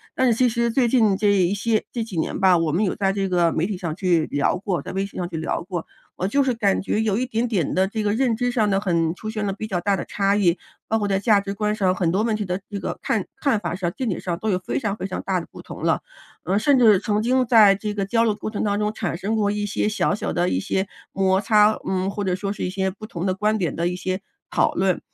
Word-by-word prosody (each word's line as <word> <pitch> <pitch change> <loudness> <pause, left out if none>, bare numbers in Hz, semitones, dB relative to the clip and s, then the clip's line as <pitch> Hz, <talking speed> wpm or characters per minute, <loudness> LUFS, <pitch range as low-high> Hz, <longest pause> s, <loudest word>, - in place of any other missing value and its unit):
但 260 - +2
是 240 - +4
其 255 - +4
实 235 +1 0
最 245 0 +2
近 220 -6 +3
这 210 - +1
一 190 -1 +2
些 215 +2 0
这 235 -2 -2
几 195 -6 -7
年 160 - -2
吧， 190 -2 +5
我 165 -2 0
们 180 +7 +1
有 185 - 0
在 195 -1 +1
这 195 -1 -1
个 175 -2 +3
媒 165 - 0
体 210 - -3
上 170 -3 -4
去 175 -4 +1
聊 145 +5 0
过， 180 -5 -2
在 - - -6
微 195 +1 -1
信 200 - -11
上 175 - -2
去 165 - -5
聊 160 - -2
过。 175 -2 -5 0.3
我 185 - -1
就 280 +7 +2
是 260 - +1
感 205 -4 +1
觉 210 - -1
有 215 -3 +1
一 255 +3 -1
点 235 0 -1
点 195 - -1
的 190 +1 +3
这 215 +2 -3
个 205 - +1
认 235 +1 +1
知 245 +1 0
上 215 -4 +1
的， 195 +1 +1
很 170 -4 +1
出 215 +4 -7
现 215 -1 -3
了 195 - -1
比 215 +2 -6
较 185 -4 -1
大 200 +1 +1
的 - - -3
差 200 0 0
异， 185 -4 +3 0.3
包 225 - +1
括 205 -2 -1
在 195 -1 +1
价 210 0 +4
值 200 0 -4
观 210 +1 -1
上， 190 -4 +2
很 175 -2 0
多 195 +5 +1
问 225 -2 +1
题 210 - -2
的 180 0 -3
这 200 - -3
个 - - -4
看 - - -1
看 270 -8 +1
法 175 -3 -3
上， 175 -2 -2
见 255 -4 -2
解 185 - -2
上 175 -2 -3
都 220 - -2
有 185 - +2
非 185 - -3
常 210 -4 -2
非 - - -4
常 190 - -4
大 190 -1 -1
的 170 - -7
不 - - -10
同 - - -10
了。 - - +2 0.4
呃， 195 - 0
甚 265 +5 +3
至 220 -5 +6
曾 210 +1 0
经 255 +2 +2
在 220 -4 +6
这 210 +1 -4
个 200 - -2
交 230 +4 +1
流 220 -2 +2
过 215 +1 -5
程 210 - -3
当 205 -1 0
中， 210 0 0
产 195 -6 -3
生 200 +5 -2
过 205 -2 +1
一 205 0 -2
些 210 - -1
小 215 -1 0
小 - - -3
的 175 +1 +1
一 90 - 0
些 190 - -1 0.3
摩 190 0 +2
擦 210 0 +4
嗯， 190 0 0
或 205 +1 -3
者 185 -2 0
说 195 +1 -3
是 205 - -5
一 - - -2
些 190 0 -1
不 205 +3 -9
同 185 -3 -4
的 185 - 0
观 210 +2 +1
点 170 -6 -1
的 170 +1 0
一 180 - -2
些 185 +1 -3 0.3
讨 - - +2
论。 185 -1 +1
200 Hz, 320 characters per minute, -23 LUFS, 185-215 Hz, 0.4 s, 至